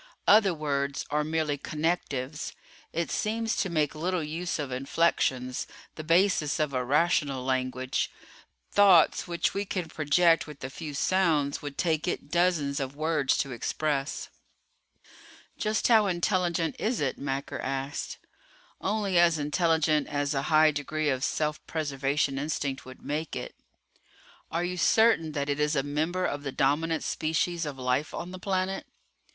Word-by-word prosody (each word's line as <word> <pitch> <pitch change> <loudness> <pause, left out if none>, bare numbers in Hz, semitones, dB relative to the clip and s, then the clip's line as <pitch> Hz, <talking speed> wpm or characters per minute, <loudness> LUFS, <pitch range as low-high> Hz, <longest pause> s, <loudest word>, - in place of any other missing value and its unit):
Other 205 -2 +6
words 140 -3 -2
are 150 0 +1
merely 155 -2 -1
connectives. 150 -2 -2 0.4
It 170 +1 -2
seems 225 +1 -1
to 190 - 0
make 155 -4 +1
little 175 +2 -1
use 165 +4 -3
of 145 -4 -4
inflections, 130 -2 0 0.3
the 155 - -7
basis 165 -2 +2
of 150 -2 0
a 125 -1 0
rational 140 -2 +1
language. 130 0 -1 0.6
Thoughts 190 -4 +5
which 170 -1 0
we 200 - -1
can 185 -4 -3
project 165 +3 +3
with 150 -2 -11
a 135 - -5
few 150 0 -7
sounds 155 -5 +1
would 145 -1 -7
take 160 -2 0
it 150 -4 -3
dozens 170 -5 +1
of 135 0 -4
words 155 -3 +1
to 135 - -1
express." 140 +4 -2 1.3
"Just 215 0 0
how 220 -3 +5
intelligent 175 -2 0
is 230 +2 0
it?" 140 -3 -1
Macker 135 0 -3
asked. 135 +1 -3 0.6
"Only 200 -3 +1
as 170 -1 +5
intelligent 155 0 +2
as 145 0 -1
a 135 - 0
high 155 0 +6
degree 150 +1 -2
of 130 -1 -1
self 150 -1 -1
preservation 140 -2 -1
instinct 140 -2 -3
would 130 0 -12
make 155 +2 -3
it." - - -5 1.0
"Are 170 +1 -1
you 180 +1 -3
certain 175 -4 +3
that 140 -1 -2
it 145 0 -1
is 150 +1 +1
a 135 - +1
member 160 +6 -1
of 145 - -2
the 140 -1 -4
dominant 155 +5 +1
species 160 +1 -1
of 140 -2 -6
life 130 +3 -1
on 175 +1 -5
the 185 - -8
planet?" 190 0 -2
155 Hz, 150 wpm, -28 LUFS, 140-175 Hz, 1.3 s, Other